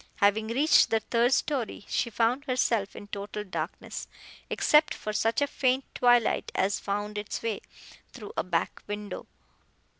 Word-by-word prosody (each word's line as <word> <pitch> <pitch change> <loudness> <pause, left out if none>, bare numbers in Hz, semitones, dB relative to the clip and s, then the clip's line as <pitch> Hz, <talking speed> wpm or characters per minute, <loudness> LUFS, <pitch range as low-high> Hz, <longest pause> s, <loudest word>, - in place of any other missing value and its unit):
Having 210 +2 +2
reached 275 +8 +4
the 225 - +2
third 235 +2 +1
story 260 -7 -1
she 235 - 0
found 235 +5 +1
herself 235 -6 0
in - - -8
total 205 +1 -5
darkness, 190 - -5 0.4
except 300 0 +4
for 215 - -5
such 225 +5 +2
faint 260 -1 +1
twilight 245 -2 +3
as 195 +1 +1
found 205 +1 -3
its 210 +2 -5
way 225 -3 -2 0.5
through 215 -5 -9
a - - 0
back 170 -2 -1
window. 205 0 -5
225 Hz, 145 wpm, -28 LUFS, 205-250 Hz, 0.5 s, reached